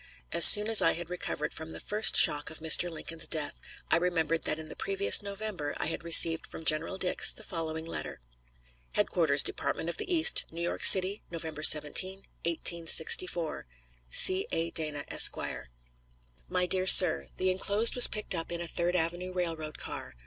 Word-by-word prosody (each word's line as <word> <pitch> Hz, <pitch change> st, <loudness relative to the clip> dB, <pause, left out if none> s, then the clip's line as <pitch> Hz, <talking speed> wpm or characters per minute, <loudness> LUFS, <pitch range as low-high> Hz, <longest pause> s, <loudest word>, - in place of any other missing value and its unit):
As 170 Hz, -, +7 dB
soon 210 Hz, 0 st, +11 dB
as 225 Hz, -1 st, +5 dB
I -, -, 0 dB
had 175 Hz, +1 st, -10 dB
recovered 180 Hz, -, -7 dB
from 160 Hz, 0 st, -12 dB
the -, -, -8 dB
first 210 Hz, +1 st, +2 dB
shock 145 Hz, 0 st, +3 dB
of 160 Hz, -, -7 dB
Mr. 160 Hz, +2 st, +1 dB
Lincoln's 165 Hz, 0 st, -8 dB
death, 155 Hz, -3 st, -5 dB, 0.3 s
I -, -, +2 dB
remembered 165 Hz, -2 st, -4 dB
that 155 Hz, -, -4 dB
in 160 Hz, 0 st, -12 dB
the -, -, -13 dB
previous 395 Hz, -, +3 dB
November 200 Hz, -7 st, -8 dB
I -, -, -5 dB
had 165 Hz, -, -6 dB
received 165 Hz, -1 st, +2 dB
from 160 Hz, -, -13 dB
General 155 Hz, +5 st, -2 dB
Dix 185 Hz, -1 st, 0 dB
the -, -, -15 dB
following 160 Hz, -2 st, -8 dB
letter: 165 Hz, -, -8 dB, 0.7 s
HEADQUARTERS, -, -, -1 dB
DEPARTMENT 165 Hz, -, -5 dB
OF 170 Hz, -, -2 dB
THE 375 Hz, -, -7 dB
EAST, 325 Hz, -2 st, +2 dB
NEW 170 Hz, +1 st, -8 dB
YORK 175 Hz, -, -6 dB
CITY, 190 Hz, +2 st, +6 dB
November 160 Hz, -2 st, -9 dB
17, 185 Hz, +6 st, +3 dB, 0.2 s
1864. 170 Hz, -, -1 dB, 0.4 s
C. 185 Hz, -, 0 dB
A. 165 Hz, 0 st, -4 dB
DANA, 150 Hz, -2 st, -5 dB
Esq. -, -, 0 dB, 1.1 s
MY 180 Hz, -, -2 dB
DEAR 185 Hz, +1 st, -3 dB
SIR: 180 Hz, -4 st, +4 dB
The 185 Hz, 0 st, -2 dB
inclosed 200 Hz, +4 st, 0 dB
was 245 Hz, -, +7 dB
picked 210 Hz, -2 st, -5 dB
up 165 Hz, -1 st, -7 dB
in 170 Hz, -, -7 dB
a 170 Hz, -, -8 dB
Third 175 Hz, +2 st, -4 dB
Avenue 175 Hz, +2 st, -5 dB
railroad 165 Hz, -4 st, -7 dB
car. -, -, -11 dB
170 Hz, 175 wpm, -26 LUFS, 160-185 Hz, 1.1 s, soon